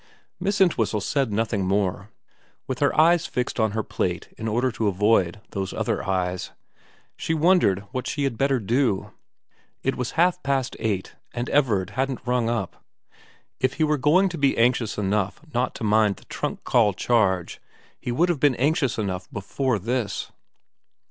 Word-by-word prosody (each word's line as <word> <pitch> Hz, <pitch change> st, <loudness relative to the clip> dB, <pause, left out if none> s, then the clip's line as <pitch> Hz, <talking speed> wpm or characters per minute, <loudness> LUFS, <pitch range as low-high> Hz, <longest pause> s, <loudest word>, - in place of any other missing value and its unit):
Miss 200 Hz, +2 st, -1 dB
Entwhistle 115 Hz, -, +2 dB
said 135 Hz, +3 st, 0 dB
nothing 110 Hz, -1 st, 0 dB
more. 100 Hz, +1 st, -1 dB, 0.6 s
With 130 Hz, -1 st, -4 dB
her 145 Hz, +1 st, +2 dB
eyes 170 Hz, +1 st, +5 dB
fixed 125 Hz, 0 st, -3 dB
on 110 Hz, -2 st, +2 dB
her 110 Hz, 0 st, -1 dB
plate -, -, -3 dB
in 110 Hz, -, -5 dB
order 120 Hz, +4 st, +1 dB
to 110 Hz, -2 st, -1 dB
avoid 100 Hz, -1 st, +2 dB
those 95 Hz, -1 st, -3 dB
other -, -, -1 dB
eyes, 90 Hz, -1 st, -1 dB, 0.7 s
she 165 Hz, -, -2 dB
wondered 155 Hz, -, +3 dB
what 130 Hz, -, -3 dB
she 145 Hz, -, -2 dB
had 135 Hz, -4 st, 0 dB
better 135 Hz, +2 st, +1 dB
do. 115 Hz, -1 st, 0 dB, 0.7 s
It 135 Hz, -, 0 dB
was 125 Hz, -2 st, -3 dB
half 180 Hz, +2 st, +3 dB
past 135 Hz, -2 st, -1 dB
eight, 105 Hz, -5 st, -2 dB, 0.2 s
and 120 Hz, +1 st, -3 dB
Everard 110 Hz, -11 st, +2 dB
hadn't 130 Hz, -1 st, -2 dB
rung 125 Hz, -2 st, +1 dB
up. 115 Hz, -6 st, -3 dB, 0.8 s
If 130 Hz, 0 st, +1 dB
he 160 Hz, -, +1 dB
were 150 Hz, -1 st, +1 dB
going 170 Hz, +8 st, +4 dB
to 170 Hz, -3 st, -6 dB
be 140 Hz, -1 st, +2 dB
anxious 120 Hz, -1 st, +2 dB
enough 100 Hz, -1 st, -1 dB
not 125 Hz, +1 st, 0 dB
to -, -, -6 dB
mind 105 Hz, -1 st, +3 dB
the -, -, -18 dB
trunk -, -, -4 dB
call 110 Hz, -5 st, +3 dB
charge 95 Hz, -5 st, +1 dB, 0.4 s
he 120 Hz, -, -4 dB
would 170 Hz, +9 st, +2 dB
have 170 Hz, -5 st, 0 dB
been 145 Hz, -3 st, +3 dB
anxious 140 Hz, -1 st, +1 dB
enough 95 Hz, -4 st, -3 dB
before 125 Hz, +4 st, -1 dB
this. 115 Hz, +1 st, -2 dB
120 Hz, 170 wpm, -24 LUFS, 105-135 Hz, 0.8 s, eyes